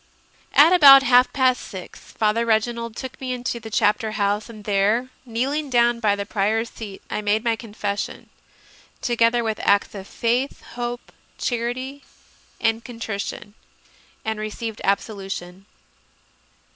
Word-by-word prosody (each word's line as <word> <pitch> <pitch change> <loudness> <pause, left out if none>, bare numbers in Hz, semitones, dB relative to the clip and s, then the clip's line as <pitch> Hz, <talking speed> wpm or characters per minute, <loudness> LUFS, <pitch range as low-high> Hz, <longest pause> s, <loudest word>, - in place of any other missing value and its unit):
3. 290 - +9
At 330 +4 +5
about 275 -6 +9
half 250 -1 +5
past 255 -2 +2
six 185 -2 -9
Father 220 +1 +1
Reginald 230 0 0
took 260 0 -8
me 255 -1 -2
into 245 -1 -3
the 225 -1 -9
Chapter 215 +1 +1
House, 205 +1 0
and 215 -2 -11
there, 210 +5 +1 0.2
kneeling 275 +6 -1
down 240 -1 +3
by 210 -3 +2
the 200 0 -4
Prior 210 +2 0
s 230 - -7
seat, 205 -4 -9
I - - -2
made 210 +1 +1
my 230 -2 +1
confession, 205 -3 -5 0.7
together 235 0 +2
with 220 -2 -2
acts 200 0 +2
of 195 -1 -8
faith, 245 +4 -1
hope, 240 0 -5 0.3
charity, 255 +3 -3 0.6
and 225 0 +1
contrition, 220 -4 -6 0.7
and 220 -1 -2
received 215 +1 -5
absolution. 195 -2 -3
230 Hz, 140 wpm, -22 LUFS, 210-245 Hz, 0.7 s, 3